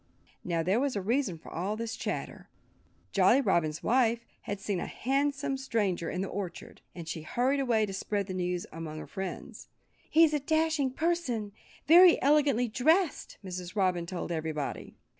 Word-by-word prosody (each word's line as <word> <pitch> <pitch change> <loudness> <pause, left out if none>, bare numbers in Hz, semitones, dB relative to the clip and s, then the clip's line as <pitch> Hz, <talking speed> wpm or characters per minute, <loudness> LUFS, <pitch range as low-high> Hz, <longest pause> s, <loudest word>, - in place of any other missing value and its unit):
Now, 170 -2 -1
there 190 +7 +2
was 275 -2 0
a - - 0
reason 225 -3 0
for - - -13
all 190 +5 -2
this 225 0 -4
chatter. - - -5 0.6
Jolly 200 +7 +5
Robin's 170 - 0
wife 235 -1 +2 0.2
had 200 -1 -2
seen 195 -2 -2
a - - -4
handsome 275 +1 -1
stranger 205 -10 -1
in 185 - -3
the 195 - -2
orchard. 185 -3 -6
And 170 -3 -8
she 165 - -4
had 155 - -11
hurried 260 +3 +2
away 235 -5 +2
to 195 - -7
spread 200 +1 -2
the 185 - -6
news 180 -1 -2
among 160 -1 -7
her - - -7
friends. 190 -1 -7 0.4
"He's 320 -1 +5
a 300 - +2
dashing 315 -1 +1
person, 260 -8 -1 0.3
very 345 +2 +8
elegantly 280 -4 +3
dressed," 315 - +1
Mrs. 180 0 -6
Robin 180 -4 +1
told 175 -1 -4
everybody. 155 -3 -4
215 Hz, 170 wpm, -29 LUFS, 180-275 Hz, 0.6 s, very